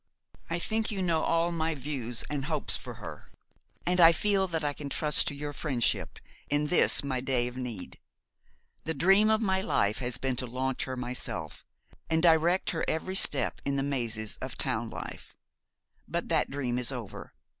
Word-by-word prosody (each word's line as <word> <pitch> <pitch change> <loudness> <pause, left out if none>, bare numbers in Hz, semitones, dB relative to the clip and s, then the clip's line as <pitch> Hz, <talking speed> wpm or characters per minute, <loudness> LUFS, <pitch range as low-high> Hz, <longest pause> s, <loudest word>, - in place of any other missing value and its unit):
I 165 - -1
think 220 +5 -1
you 195 -3 -2
know 165 -3 +1
all 165 +1 +1
my 160 -1 -1
views 130 -4 -2
and 145 -2 -3
hopes - - +2
about - - -6
her; - - -9 0.6
and 180 +1 +3
I 165 0 +10
feel 195 +3 +1
that 165 -3 -2
I 145 -1 0
can 145 0 -7
trust 150 +4 +3
to 145 - -2
your 145 +1 -5
friendship 130 -4 -1 0.3
in 145 +1 +1
this 180 - +5
my 130 -3 -2
day 125 -2 0
of 125 - -7
need. 125 -7 -6 0.9
The 160 - -2
dream 195 +8 +5
of 220 +1 +2
my 190 -2 +1
life 105 - +1
has 125 -1 -2
been 130 -2 -1
to 125 - -2
launch 130 +2 -1
her 130 -1 -5
myself, 120 -10 -3 0.5
and 160 0 +1
direct 170 +2 +4
her 165 - -2
every 175 +4 -2
step 145 -7 +2
in 140 0 -1
the 135 - 0
mazes 120 -6 -2
of - - -7
town - - -1
life; - - -8 0.7
but - - -3
that - - +1
dream 125 -3 -2
is 125 +1 -1
over. 120 -6 -8
145 Hz, 185 wpm, -29 LUFS, 125-170 Hz, 0.9 s, I